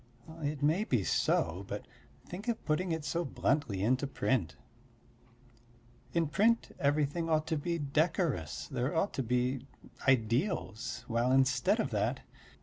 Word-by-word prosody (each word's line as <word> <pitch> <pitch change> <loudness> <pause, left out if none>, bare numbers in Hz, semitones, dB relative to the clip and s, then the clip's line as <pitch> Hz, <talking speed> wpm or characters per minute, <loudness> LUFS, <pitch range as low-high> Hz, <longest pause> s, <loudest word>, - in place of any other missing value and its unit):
It 145 -1 -2
may 160 +8 +3
be 125 - +1
so, 85 +1 +1
but - - -5 0.4
think 195 +6 -8
of 235 -2 -2
putting 170 +3 0
it 160 -2 -2
so 170 +2 0
bluntly 135 - 0
into 130 +5 +2
print. 110 - 0 1.6
In 170 -1 +2
print 210 +10 +2
everything 145 +3 +1
ought 155 -1 +2
to 160 - -1
be 170 +3 -1
decorous; 150 - 0
there 130 +6 -2
ought 180 +5 +1
to - - -1
be 125 +2 0 0.4
ideals, 120 - +1
while 120 +2 +1
instead 130 0 +3
of - - 0
that.... - - 0
145 Hz, 140 wpm, -32 LUFS, 125-165 Hz, 1.6 s, may